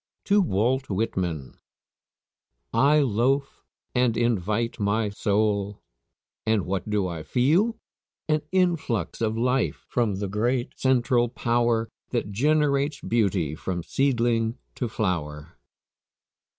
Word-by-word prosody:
TO 205 0 +4
WALT 130 - 0
WHITMAN. 90 - -2 1.1
"I 150 +2 +4
loafe 135 +3 0 0.3
and 125 -2 +2
invite 115 0 0
my 105 +1 +1
soul." 100 0 0 0.6
And 110 -3 +1
what 95 +3 -3
do 105 -2 +1
I 85 -3 -5
feel? 160 - +2 0.5
An 155 -1 +2
influx 165 - 0
of 110 0 0
life 125 +2 0
from 115 -5 +1
the 100 +1 -3
great 120 +5 0
central 120 -2 +2
power 120 -1 +1 0.2
That 115 -4 -2
generates 145 +4 +1
beauty 100 -9 0
from 85 +2 -4
seedling 120 -3 +1 0.2
to 120 - -3
flower. 80 -7 -3
115 Hz, 110 wpm, -25 LUFS, 100-130 Hz, 1.1 s, TO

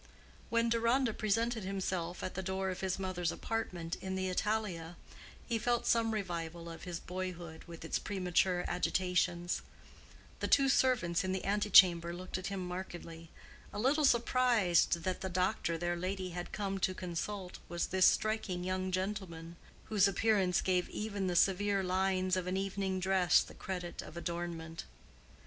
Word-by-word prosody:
When 230 0 +2
Deronda 235 +1 +2
presented 225 +2 0
himself 185 -2 -3
at 185 - -3
the 190 - -3
door 190 0 -2
of 185 - -6
his 190 -1 -1
mother's 185 -3 -1
apartment 180 -7 -3
in 190 0 -3
the 190 0 -1
Italia 185 -4 -2 0.5
he 230 -2 0
felt 240 +2 +1
some 230 -1 +3
revival 170 -4 -4
of 165 - -9
his 175 -2 -4
boyhood 180 -3 -6
with 165 -1 -9
its - - -1
premature 180 -2 +1
agitations. 180 -1 0 0.8
The - - -1
two 275 -1 +5
servants 230 -11 +2
in 185 0 -1
the 190 - -3
antechamber 185 -4 +5
looked 185 +1 -5
at 185 - -4
him 190 -2 -3
markedly, 175 -2 -7 0.4
a - - -7
little 275 +8 +2
surprised 235 - +3
that 185 +1 -2
the 190 - -2
doctor 180 -2 0
their 175 +1 -1
lady 185 +1 -3
had 175 +1 -5
come 195 -2 -2
to 185 0 0
consult 180 +2 -4
was 170 0 -1
this 190 0 +4
striking 215 -5 0
young 185 0 -1
gentleman 185 -3 -3 0.3
whose 205 -2 +3
appearance 195 -2 +2
gave 180 -1 +1
even 205 -3 -3
the 180 - -1
severe 195 +2 +3
lines 185 0 +1
of 185 -1 -2
an 185 +1 0
evening 195 -1 -1
dress 185 -1 +4
the - - -12
credit 180 -2 -5
of 170 - -10
adornment. 170 -1 -4
185 Hz, 160 wpm, -33 LUFS, 175-200 Hz, 0.8 s, two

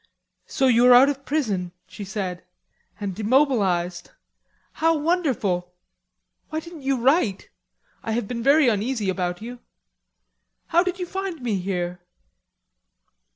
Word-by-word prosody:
"So 270 - 0
you 245 -1 +5
are 250 - +8
out 265 +3 +7
of 275 -1 -4
prison," 200 - -1
she 205 - -9
said, 190 -3 -4 0.6
"and 200 -2 -3
demobilized. 200 -7 +1 0.6
How 325 0 +2
wonderful! 250 - -1 0.7
Why 315 - -2
didn't 335 -1 -11
you 270 -1 0
write? 250 - +1 0.5
I 225 - -3
have 230 -2 -2
been 235 +1 -4
very 280 +3 +5
uneasy 215 -2 0
about 180 +1 -3
you. 245 +1 -8 1.1
How 340 +1 +4
did 365 0 -2
you 365 - -3
find 380 -5 -5
me 215 -5 -1
here?" 180 -1 -3
240 Hz, 130 wpm, -23 LUFS, 190-290 Hz, 1.1 s, are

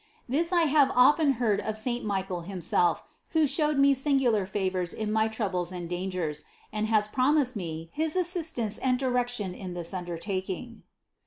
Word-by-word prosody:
This 315 +8 +1
I 345 -2 +4
have 290 -3 +4
often 280 +3 +5
heard 225 -5 +1
of 215 0 -3
saint 240 +2 -1
Michael 190 -3 -2
himself, 175 -1 0 0.3
who 320 -2 +4
showed 300 +1 +1
me 275 0 +5
singular 265 -7 +2
favors 185 -3 -2
in 215 -1 -3
my 220 0 +2
troubles 190 -6 -2
and 175 -2 -5
dangers, 175 -4 -3 0.3
and 215 0 -1
has 215 -1 +2
promised 260 +2 +2
me 165 -4 -5
his 315 +1 0
assistance 325 - -1
and 255 -1 +1
direction 245 -6 -1
in 180 -1 -7
this 170 0 -4
under 175 -2 -4
taking. 195 +6 -4
220 Hz, 165 wpm, -28 LUFS, 185-270 Hz, 0.3 s, often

